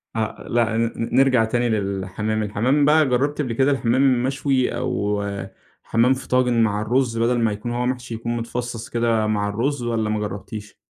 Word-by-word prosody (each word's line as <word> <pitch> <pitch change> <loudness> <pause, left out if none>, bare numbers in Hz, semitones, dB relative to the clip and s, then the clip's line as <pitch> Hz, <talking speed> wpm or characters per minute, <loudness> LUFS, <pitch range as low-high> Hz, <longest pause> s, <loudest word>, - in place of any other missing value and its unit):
آه، 110 -1 -3
لأ، 115 -1 +1
ن 115 0 +1 0.2
نرجع 130 -4 +4
تاني 120 +1 0
للحمام، 105 +1 -2
الحمام 125 +8 +1
بقى 155 +1 +5
جربتِ 140 +4 +1
قبل 125 -5 -2
كده 135 +4 +2
الحمام 130 0 +2
مشوي 135 -1 0
أو 105 -5 -1 0.6
حمام 120 +3 +3
في 130 - -7
طاجن 125 -2 +2
مع 105 -1 0
الرز 120 +1 0
بدل 120 +1 +2
ما 115 -2 +2
يكون 105 +3 -5
هو 120 +1 -1
محشي 125 -1 -3
يكون 115 +1 -3
متفصص 120 +1 -5
كده 115 -3 +1
مع 105 -1 0
الرز، 125 +5 -1
والَّا 115 -2 -1
ما 110 - 0
جربتيش؟ 105 +1 -6
120 Hz, 175 wpm, -22 LUFS, 110-130 Hz, 0.6 s, بقى